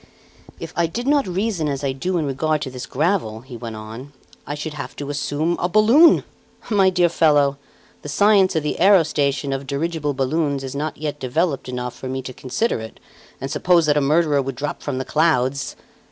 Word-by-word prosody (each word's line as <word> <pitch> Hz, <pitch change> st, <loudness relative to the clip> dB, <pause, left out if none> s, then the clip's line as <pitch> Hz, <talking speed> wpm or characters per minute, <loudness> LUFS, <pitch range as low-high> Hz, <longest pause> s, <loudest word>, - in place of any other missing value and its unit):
"If -, -, -7 dB
I 170 Hz, 0 st, +2 dB
did 235 Hz, +9 st, -5 dB
not 285 Hz, -4 st, +2 dB
reason 185 Hz, -3 st, -1 dB
as 140 Hz, -1 st, -3 dB
I 135 Hz, -, 0 dB
do 175 Hz, +8 st, -2 dB
in 160 Hz, -, 0 dB
regard 150 Hz, +2 st, -1 dB
to 130 Hz, -, -5 dB
this 125 Hz, -1 st, -7 dB
gravel," 145 Hz, -, -1 dB
he 130 Hz, 0 st, -11 dB
went 115 Hz, -1 st, -7 dB
on, 110 Hz, +6 st, -9 dB, 0.3 s
"I 145 Hz, -, -3 dB
should 150 Hz, +1 st, -5 dB
have 145 Hz, -1 st, -7 dB
to 145 Hz, 0 st, -5 dB
assume 150 Hz, +3 st, -1 dB
a 175 Hz, -, 0 dB
balloon! 235 Hz, -, +6 dB, 0.5 s
My 195 Hz, -3 st, +5 dB
dear 180 Hz, -2 st, +3 dB
fellow, 145 Hz, -4 st, +3 dB, 0.4 s
the 145 Hz, -, -8 dB
science 195 Hz, +3 st, +4 dB
of 160 Hz, -, +1 dB
the 150 Hz, -, -2 dB
aerostation 150 Hz, -7 st, +3 dB
of 135 Hz, 0 st, -5 dB
dirigible 150 Hz, 0 st, -2 dB
balloons 140 Hz, +1 st, 0 dB
is 135 Hz, 0 st, -6 dB
not 150 Hz, +2 st, -3 dB
yet 150 Hz, -1 st, -4 dB
developed 140 Hz, +2 st, -1 dB
enough 125 Hz, -1 st, -4 dB
for 130 Hz, -, -7 dB
me 130 Hz, 0 st, -3 dB
to 130 Hz, -, -7 dB
consider 130 Hz, -, -1 dB
it 110 Hz, 0 st, -9 dB, 0.4 s
and 135 Hz, +1 st, -5 dB
suppose 175 Hz, -3 st, +3 dB
that 150 Hz, -1 st, +3 dB
a 150 Hz, -, +3 dB
murderer 150 Hz, 0 st, +2 dB
would 135 Hz, -1 st, -4 dB
drop 145 Hz, +3 st, -4 dB
from 140 Hz, -3 st, -3 dB
the 130 Hz, -, -3 dB
clouds! 140 Hz, -3 st, +1 dB
145 Hz, 200 wpm, -21 LUFS, 135-170 Hz, 0.5 s, balloon